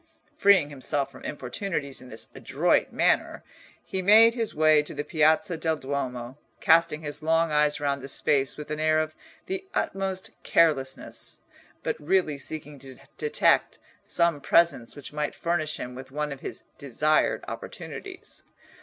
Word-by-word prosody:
Freeing 190 -7 +4
himself 140 0 -2
from 130 - -14
importunities 140 +1 -4
in 130 - -12
this 110 - -5
adroit - - +1
manner, - - +1 0.4
he 190 - -3
made 220 +4 +7
his 230 -2 -3
way 155 0 +5
to 150 - -8
the 145 - -2
Piazza 160 +4 +2
del 160 0 0
Duomo, 130 -2 -4 0.2
casting 165 -1 +3
his 145 +1 -5
long 165 +1 +2
eyes 150 0 +2
round 140 -1 -1
the 135 - -7
space 135 0 +1
with 150 0 -8
an 150 - -3
air 155 0 +3
of 155 0 -2 0.3
the 380 +1 -4
utmost 190 -1 -2
carelessness, 135 -5 0 0.4
but - - -1
really 155 -2 +1
seeking 150 0 -7
to 130 -1 -11 0.2
detect 455 +2 +2 0.3
some 170 -4 +1
presence 170 -10 +2
which 145 0 -9
might 150 0 -2
furnish 155 -3 -1
him 125 - -6
with 130 +1 -9
one 150 +2 -3
of 140 - -6
his - - -7 0.2
desired 150 +2 +1
opportunities. 380 -2 -8
150 Hz, 155 wpm, -26 LUFS, 140-170 Hz, 0.4 s, made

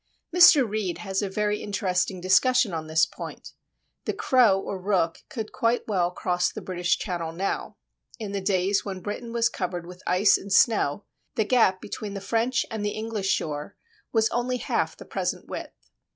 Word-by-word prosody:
Mr. 320 -7 +8
Reid 210 -4 -2
has 195 -1 -2
a 200 - -2
very 210 +1 -1
interesting 190 -2 -1
discussion 215 +4 +3
on 160 -1 -4
this 160 +1 +4
point. - - -9 0.5
The - - -1
crow 235 -8 +4
or 195 -1 -5
rook 180 -4 +1
could 220 -4 -5
quite 235 +1 0
well 185 -5 +1
cross 180 0 0
the - - -6
British 180 -1 0
Channel 170 -4 -4
now. 190 +4 -3 0.4
In 215 -4 -5
the 200 -1 -2
days 190 +1 +1
when 190 -2 -5
Britain 220 +5 -5
was 235 0 +2
covered 180 -6 -4
with 180 +1 -11
ice 180 +4 +4
and 200 - -10
snow, 205 - +3 0.3
the 220 - +1
gap 210 -6 +3
between 205 0 -6
the - - -3
French 230 +6 0
and 220 -2 -3
the 205 - -2
English 215 -3 -3
shore 150 0 -2 0.3
was 220 -1 +3
only 250 +1 -1
half - - -1
the - - -11
present - - -3
width. - - -9
200 Hz, 180 wpm, -26 LUFS, 180-225 Hz, 0.5 s, Mr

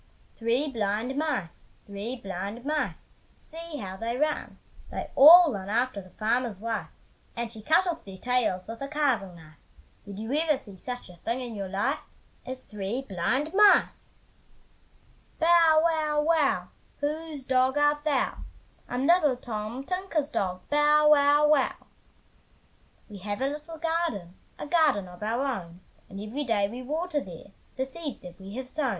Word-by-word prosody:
Three 240 +6 0
blind 220 +3 -1
mice, 280 - -2 0.2
three 205 +5 -5
blind 200 +2 -6
mice, 300 0 -2 0.3
See 330 -1 -6
how 190 -5 -6
they 230 +3 -3
run! 300 +2 -1 0.3
They - - -5
all 325 +1 +9
run 195 -1 -5
after 235 -1 0
the 185 - -15
farmer's 225 0 -1
wife, 215 -7 -3 0.5
And 235 -1 -4
she 220 - -9
cut 320 - +3
off 340 -2 -3
their 195 -1 -10
tails 240 -5 0
with 225 +2 -8
a 275 - -3
carving 270 - 0
knife, 155 -2 -16 0.4
Did 200 -1 -9
you 220 +5 -4
ever 305 -1 +2
see 205 -7 -11
such 245 +6 -7
a 180 - -14
thing 230 +8 -3
in 245 -2 -6
your 200 -3 -5
life 205 +9 0 0.5
As 260 0 -6
three 210 +5 -4
blind 260 - -1
mice! 415 0 +4 1.2
Bow, 330 -1 +6
wow, 310 -3 +1
wow! 315 -3 +2 0.3
Whose 300 -1 -4
dog 260 +1 +2
art 295 0 +2
thou? 295 -4 0 0.5
"I'm 250 +2 -1
little 310 -5 +4
Tom 230 +1 -5
Tinker's 365 -3 -2
dog, 185 -9 -2
Bow, 300 +1 +5
wow, 290 0 +5
wow!" 300 -3 +3 1.3
We 205 -3 -10
have 205 +3 -4
a 265 - 0
little 300 +3 -6
garden, 325 - -2 0.2
A - - -6
garden 295 - +2
of 180 +1 -13
our 230 +6 -1
own, 180 -9 -4 0.3
And 195 - -8
every 220 +8 -4
day 215 -6 +1
we 240 +5 -7
water 305 +4 -2
there 180 0 -11 0.2
The 265 - -1
seeds 290 +1 -6
that 180 +1 -11
we 195 +2 -9
have 260 0 -5
sown. 270 0 -1
255 Hz, 160 wpm, -27 LUFS, 205-300 Hz, 1.3 s, all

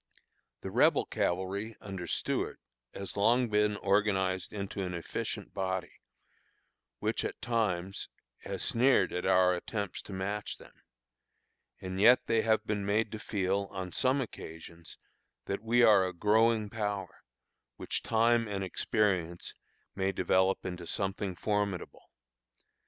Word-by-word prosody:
The - - -5
Rebel - - +4
cavalry 95 +5 -2
under 95 -3 -6
Stuart - - -1 0.3
has 100 -1 -6
long 120 +4 +3
been 105 0 +2
organized 95 -2 +1
into 100 -1 -4
an 90 -2 -3
efficient 85 - -4
body, 95 -2 -2 1.1
which, - - -1
at - - -4
times, 100 -6 -1 0.3
has - - -4
sneered 120 -5 +3
at 90 - -2
our 90 0 +5
attempts 100 +2 -4
to - - -11
match 100 +2 -3
them; - - -16 1.1
and 95 +1 -4
yet 125 +4 +6
they 115 -1 +2
have 110 -1 +2
been 105 -2 -1
made 105 +2 +1
to 110 - -5
feel, 100 -1 -1
on 95 -2 -5
some 130 +6 +2
occasions, 85 -7 -9 0.5
that 100 - -3
we 120 +2 +3
are 100 -5 +6
a 90 - -5
growing 110 +3 +3
power, 105 -4 -3 0.5
which - - -3
time 115 0 +3
and 100 -1 -3
experience 95 -3 0 0.4
may 95 0 0
develop 95 0 +1
into 90 -2 -5
something 95 0 -2
formidable. 100 -1 -2
100 Hz, 130 wpm, -31 LUFS, 95-110 Hz, 1.1 s, yet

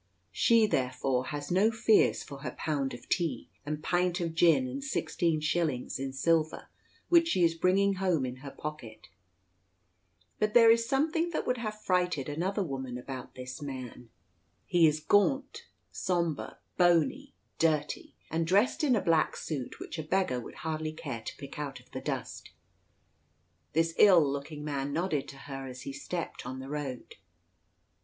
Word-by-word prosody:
She, 230 -2 +4
therefore, 130 -6 0
has 145 0 -5
no 195 +5 +4
fears 225 -1 +3
for 140 -1 -9
her 130 -3 -6
pound 140 -5 -1
of - - -13
tea, 170 -4 -1
and 150 +1 -4
pint 180 0 +1
of 165 -2 -2
gin, 170 +10 +4
and 270 +2 -5
sixteen 170 - 0
shillings 155 -6 -1
in 135 0 -3
silver 155 +3 0 0.4
which 335 -1 +6
she 185 - +2
is 165 -1 +4
bringing 190 +4 +3
home 175 -8 +2
in 125 0 -5
her 140 +2 -8
pocket. 120 -9 -8 1.3
But 215 0 0
there 230 -1 +8
is 230 0 +2
something 320 +5 +1
that 340 - -2
would 250 -1 0
have 215 -2 -5
frighted 180 -7 +1
another 185 +7 -1
woman 130 -5 -4
about 130 +1 -8
this 125 +1 -7
man. 130 -4 -7 0.6
He 175 -3 +5
is 155 0 +1
gaunt, 275 - +1 0.2
sombre, 170 -5 -2 0.2
bony, 170 - +2 0.2
dirty, 155 -2 0 0.2
and 165 +1 0
dressed 205 - +3
in 265 -5 +4
a 210 - +1
black 165 -3 +2
suit 140 -6 -5
which - - -6
a - - -3
beggar 170 -6 0
would 120 - -9
hardly 155 -1 -2
care 115 -7 -6
to - - -7
pick 140 +1 -9
out 140 -2 -4
of - - -22
the - - -5
dust. - - -5 1.2
This 165 +1 +2
ill 180 -7 +7
looking 140 +2 -4
man 140 -1 -2
nodded 160 -3 -1
to 135 - -10
her 135 -1 -7
as 130 0 -8
he 280 - -6
stepped 180 - -5
on 130 +1 -6
the 130 +1 -7
road. 140 -4 -5
160 Hz, 165 wpm, -30 LUFS, 135-190 Hz, 1.3 s, there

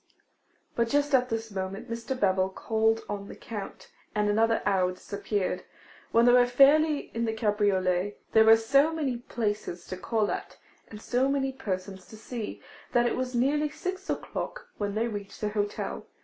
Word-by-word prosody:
But 235 -1 +1
just 290 +1 +1
at 250 -1 +4
this 225 -1 -3
moment, 190 0 -4
Mr. 235 +3 -4
Bevil 190 -1 +2
called 220 +3 +1
on 200 -1 -5
the - - -9
Count, 210 -4 -8 0.2
and 210 0 +2
another 225 +2 +2
hour 185 -2 +2
disappeared. 200 +1 -3 0.5
When 230 +1 +5
they 245 - +7
were 245 0 +6
fairly 285 +4 +4
in 230 0 -1
the 225 - -1
cabriolet, 205 -3 +1
there 220 0 +6
were 225 0 +8
so 275 +7 +3
many 290 -6 -1
places 210 -7 -3
to 185 - -6
call 215 +2 0
at, - - -5 0.3
and 210 - -9
so 255 +4 +1
many 270 -1 0
persons 190 -5 -5
to 220 - -12
see, 225 -1 -6 0.3
that 240 0 +4
it - - +1
was 255 -1 -3
nearly 295 +5 +2
six 370 +6 -5
o'clock - - -4
when 205 -1 -2
they 225 +2 +1
reached 205 -3 -6
the 210 - -1
hotel. 205 -1 -3
225 Hz, 175 wpm, -28 LUFS, 205-250 Hz, 0.5 s, were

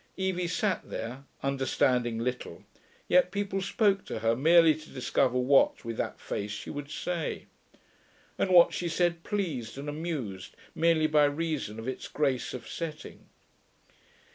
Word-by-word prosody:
Evie 190 -2 -1
sat 185 +2 -1
there, 125 +5 -6 0.2
understanding 130 -3 +1
little, 125 +2 -4 0.4
yet 180 0 +4
people 200 0 -2
spoke 200 0 +2
to - - -5
her 115 +1 +1
merely 165 +4 +6
to 155 +1 -11
discover 125 0 0
what, 130 0 +3
with 115 -1 -4
that - - -3
face, 100 - -4
she 105 0 -6
would 145 0 -6
say. 170 0 -3 0.9
And - - 0
what 175 -2 +7
she 175 - -2
said 170 0 +1
pleased 155 - -3
and 140 +2 -6
amused 145 - -5 0.2
merely 165 -1 +3
by 150 -1 +4
reason 145 -7 -2
of 115 +2 -7
its 130 - -4
grace 135 -4 -1
of 125 - -8
setting. 160 -3 -7
150 Hz, 145 wpm, -29 LUFS, 125-175 Hz, 0.9 s, what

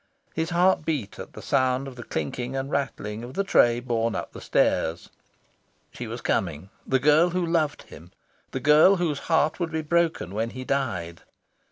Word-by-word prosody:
His 160 +1 -2
heart 180 -1 +3
beat 145 -10 -3
at - - -9
sound 130 0 +1
of 130 - -9
the 120 - -8
clinking 120 - -4
and 135 +1 -3
rattling 115 -6 -3
of 125 +2 -9
the 200 - +1
tray 120 -11 +4
borne 115 -2 -1
up - - -4
the - - -9
stairs. 80 +1 0 0.8
She - - -7
was - - -6
coming, 85 +1 -2 0.2
the 130 - +3
girl 150 +6 +4
who 180 0 -1
loved 165 -3 0
him, 80 +3 -14 0.4
the 130 - -4
girl 150 +8 +6
whose 165 -6 -1
heart 160 0 +2
would 170 -2 -2
be 160 0 -2
broken 160 - 0
when 110 +2 -1
he 130 +2 -7
died. 95 -13 -2
135 Hz, 180 wpm, -25 LUFS, 115-160 Hz, 0.8 s, girl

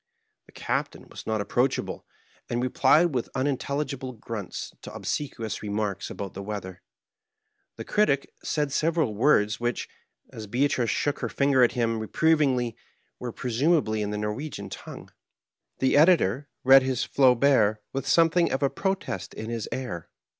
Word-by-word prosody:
The - - -18
Captain - - -3
was - - -10
not 110 -2 -1
approachahle, 125 +4 0 0.5
and 120 - -1
replied 140 +6 +3
with 125 -3 -2
unintelligihle 140 -1 -2
grunts 110 -5 -6
to - - -8
ohseqaious 115 -7 -4
remarks 105 -2 -3
ahout 100 -2 -6
the 100 - -6
weather. 100 -3 -6 0.9
The - - -7
Oritic 140 -10 +2 0.2
said 150 -2 -1
several 155 -5 +1
words 105 -2 +3
which, 120 -1 -2 0.5
as 110 -1 -7
Beatrice 125 +1 +1
shook 145 +6 0
her 115 - -2
finger 140 +4 +2
at 120 - +4
him 115 -2 0
reprovingly, 130 -1 +1 0.4
were 125 -1 -4
presumahly 125 -1 +1
in 105 - -2
the 105 - -3
Korwegian 105 +9 -4
tongue. - - -9 0.7
The 130 - +2
Editor 145 - +4
read 135 +1 +8
his 130 -1 -1
Flauhert 125 -5 +4 0.2
with 135 -1 -3
something 170 +1 +4
of 135 - -1
a 140 - +2
protest 190 - -3
in 110 +1 -5
his 115 -3 -4
air. 120 -11 -5
125 Hz, 145 wpm, -26 LUFS, 110-140 Hz, 0.9 s, read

